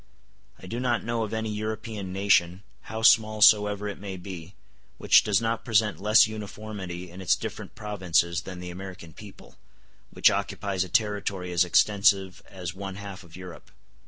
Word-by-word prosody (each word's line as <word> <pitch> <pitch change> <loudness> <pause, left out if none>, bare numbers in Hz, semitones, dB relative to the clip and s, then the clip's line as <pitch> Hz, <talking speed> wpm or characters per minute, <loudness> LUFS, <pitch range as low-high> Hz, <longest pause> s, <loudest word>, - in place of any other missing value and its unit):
I - - -13
do 115 +6 -5
not 125 -2 0
know 115 0 -2
of 110 - -3
any 110 -1 -3
European 110 -2 -5
nation, 95 -1 +2 0.3
how 110 0 -5
small 110 -1 +5
soever 105 -1 +5
it 100 - -6
may 95 -1 -7
be, 90 -1 -9 0.4
which - - +5
does 100 -3 +2
not 115 0 -2
present 110 -3 +1
less 105 +2 +6
uniformity 105 -4 -7
in 90 +2 -10
its 90 -5 +3
different - - -7
provinces 90 -5 0
than 90 +1 -9
the 90 0 -7
American 90 -3 -9
people, 100 +2 -14 0.5
which - - +4
occupies 100 -2 -2
a 95 - -9
territory 100 -3 -1
as 85 0 +3
extensive 100 +1 +2
as 90 -3 -7
one 95 0 -7
half 100 -1 -8
of 85 -1 -15
Europe. 90 -2 -11
100 Hz, 165 wpm, -26 LUFS, 90-110 Hz, 0.5 s, less